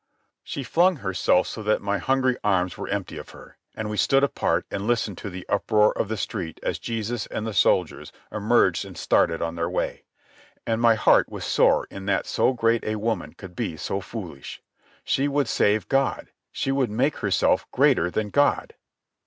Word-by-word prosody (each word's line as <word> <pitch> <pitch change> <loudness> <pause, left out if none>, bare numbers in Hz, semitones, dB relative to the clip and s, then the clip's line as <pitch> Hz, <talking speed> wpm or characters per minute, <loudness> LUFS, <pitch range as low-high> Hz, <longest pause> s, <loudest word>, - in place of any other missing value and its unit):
She 140 - -5
flung 175 +8 +3
herself 95 - +1
so 110 - -6
that 105 0 +1
my 100 0 -1
hungry 130 +3 +1
arms 95 -4 +1
were - - -6
empty - - -4
of - - -10
her, - - -15 0.2
and 110 - -4
we 105 0 -4
stood 135 +4 +3
apart 140 - 0
and 100 +1 -3
listened 115 -5 0
to 105 - -6
the 90 -1 -8
uproar 105 +1 +2
of - - -1
the 110 +1 -3
street 85 -4 -4
as - - -2
Jesus 115 0 -3
and 110 - -4
the 110 - -3
soldiers 90 -2 +1 0.2
emerged 110 +3 +2
and - - -11
started 80 0 +2
on 80 0 -2
their 85 0 -2
way. - - -3 0.6
And 115 0 -1
my 115 -1 +5
heart 110 - +4
was - - -6
sore - - +3
in 95 0 -8
that 100 - +1
so - - +2
great 115 -2 +1
a 110 - -2
woman 110 +2 -2
could 95 -3 -12
be 80 - -3
so 95 - -3
foolish. 90 -9 -8 0.4
She 135 +2 +1
would 145 -2 0
save 105 -1 +1
God. 135 -1 0 0.2
She 135 - -2
would 135 -3 +1
make 125 +8 0
herself 100 -4 +1
greater 90 - +3
than 105 +2 -2
God. 145 0 +2
110 Hz, 190 wpm, -24 LUFS, 95-120 Hz, 0.6 s, my